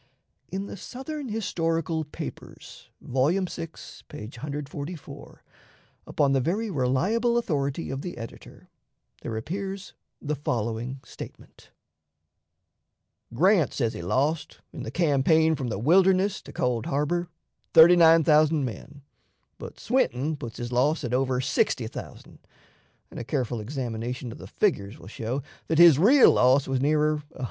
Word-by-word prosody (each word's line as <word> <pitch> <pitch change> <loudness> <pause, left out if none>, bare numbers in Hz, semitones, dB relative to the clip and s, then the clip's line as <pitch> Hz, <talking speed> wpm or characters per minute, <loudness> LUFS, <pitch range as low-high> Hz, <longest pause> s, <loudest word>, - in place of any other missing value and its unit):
In 195 +1 -3
the 200 - -8
"Southern 270 - -7
Historical 165 -6 -1
Papers," 150 - -10
vol. 130 +3 +1
vi, 180 -2 -2 0.4
page 110 +4 -9
144, 145 +3 -7 0.6
upon 145 -2 +1
the 135 -1 +2
very 205 - -1
reliable 190 - +1
authority 145 - -2
of 135 0 -4
the 180 +2 -7
editor, 115 -1 -11 0.5
there 110 - -4
appears 195 - -5 0.3
the 150 - -3
following 120 -1 -3
statement: - - -12 1.7
"Grant 180 - +3
says 115 -4 0
he - - -6
lost, 145 - -1
in - - -7
the - - -5
campaign 160 0 +3
from 135 -5 -3
the 110 - -3
Wilderness 190 - +3
to - - -10
Cold 120 -3 -1
Harbor, 170 +5 -1 0.5
39,000 160 -3 +6
men; 135 +5 -8 0.6
but - - -9
Swinton 155 - 0
puts 120 -5 -8
his 120 0 -5
loss 145 +6 +1
at 120 -1 -3
over 130 0 +1
60,000, 130 - -3 0.7
and - - -8
a - - -4
careful 120 -3 -2
examination 120 0 -4
of - - -11
the - - -9
figures 100 +1 -1
will - - -14
show 115 +6 -4 0.2
that 160 - 0
his 170 -4 +8
real 255 - +7
loss 130 +2 +3
was 135 -1 -1
nearer 150 +1 +2 0.2
100,000. - - -14
150 Hz, 135 wpm, -26 LUFS, 125-175 Hz, 1.7 s, his